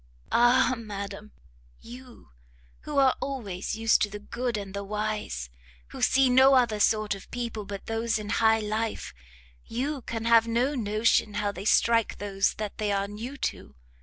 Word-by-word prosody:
"Ah 245 +2 +4
madam! 205 -2 -7 0.5
You, 250 - -13 0.6
who 300 -1 -4
are 270 -2 +5
always 215 -11 -4
used 225 0 +3
to 205 - +2
the 210 - -7
good 235 +3 -3
and 200 -2 -7
the 200 0 -4
wise, 210 - -4 0.4
who - - -9
see 270 0 +4
no 260 +2 +6
other 235 -5 +2
sort 215 0 +2
of 195 - -11
people 235 -3 -5
but 200 0 -7
those 225 0 -1
in 210 -1 -6
high 220 0 +4
life, 215 +1 -3 0.5
you 270 +4 -3
can 225 -1 -5
have 230 -1 +5
no 240 +5 +1
notion 215 -3 +1
how 205 0 0
they 200 - -8
strike 230 0 +3
those 195 -1 0
that 215 0 -6
they 210 -1 0
are 200 0 0
new 230 +7 -7 0.2
to! 70 - -15
220 Hz, 165 wpm, -27 LUFS, 205-240 Hz, 0.6 s, no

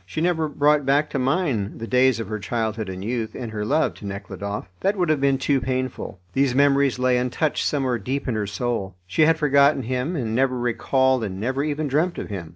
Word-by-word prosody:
She 95 +10 -6
never 160 -1 +1
brought 150 0 +3
back 140 +3 +2
to 140 - -1
mind 130 - 0
the 115 - -4
days 125 0 +3
of 115 - -4
her 110 0 -4
childhood 110 -1 -2
and 95 +1 -6
youth, 115 -1 -3
and 120 -3 -5
her 105 -1 -3
love 150 +9 +1
to - - -10
Nekhludoff. 100 0 -5
That 200 +2 0
would 175 -3 +1
have 155 -3 +2
been 140 -1 +3
too 135 0 +1
painful. 130 -5 -3
These 135 -2 +2
memories 140 -1 +3
lay 125 -1 +2
untouched 125 +5 -1
somewhere 130 -5 0
deep 135 +8 -3
in 125 - 0
her 105 -2 -2
soul; 100 -3 -3
she 95 - +3
had 165 0 +4
forgotten 140 -2 +4
him, 130 +8 -2
and 115 -7 -2
never 130 +1 +1
recalled 130 +1 +1
and 95 -3 -4
never 130 +6 -1
even 150 0 -2
dreamt 155 +6 0
of - - -5
him. 85 -5 -5
130 Hz, 220 wpm, -23 LUFS, 110-140 Hz, -, had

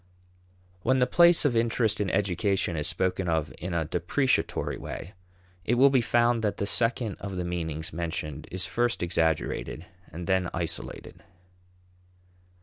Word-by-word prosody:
When 130 +6 +2
the 125 - +4
place 170 +4 +5
of 130 -5 +2
interest 115 -2 +1
in 100 - 0
education 95 -1 0
is 75 0 -1
spoken 95 0 0
of 80 0 -1
in 90 -1 -4
a 80 -1 0
depreciatory 90 - 0
way, 95 - -7 0.5
it 120 - +1
will 135 +3 +6
be 130 -2 +4
found 120 0 +2
that 105 - 0
the 100 - -1
second 115 0 +1
of 100 -2 -6
the 90 -1 -3
meanings 80 -2 -3
mentioned 80 -3 -4
is 95 0 -1
first 120 -5 0
exaggerated 80 -1 -1 0.3
and 85 +2 -6
then 95 -1 +1
isolated. 85 0 -4
95 Hz, 145 wpm, -27 LUFS, 85-120 Hz, 0.5 s, will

